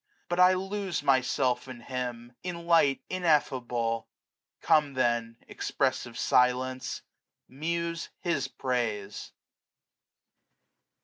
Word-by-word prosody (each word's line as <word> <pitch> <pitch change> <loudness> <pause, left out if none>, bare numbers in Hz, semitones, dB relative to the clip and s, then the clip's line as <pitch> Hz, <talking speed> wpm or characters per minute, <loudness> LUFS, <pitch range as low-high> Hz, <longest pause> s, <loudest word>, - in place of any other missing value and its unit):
But 175 +1 -1
I 180 0 +7
lose 190 -3 -3
Myself 130 -2 +2
in 125 -2 -9
Him, 125 -2 -5
in 170 -2 -5
Light 165 -5 +4
ineffable! 125 -9 +1 0.5
Come 150 -3 +3
then, 120 -2 0
expressive - - -1
silence, 125 +1 +1 0.4
muse 170 +4 -3
his 170 -6 0
praise. 110 -6 -3
130 Hz, 85 wpm, -29 LUFS, 120-170 Hz, 0.5 s, I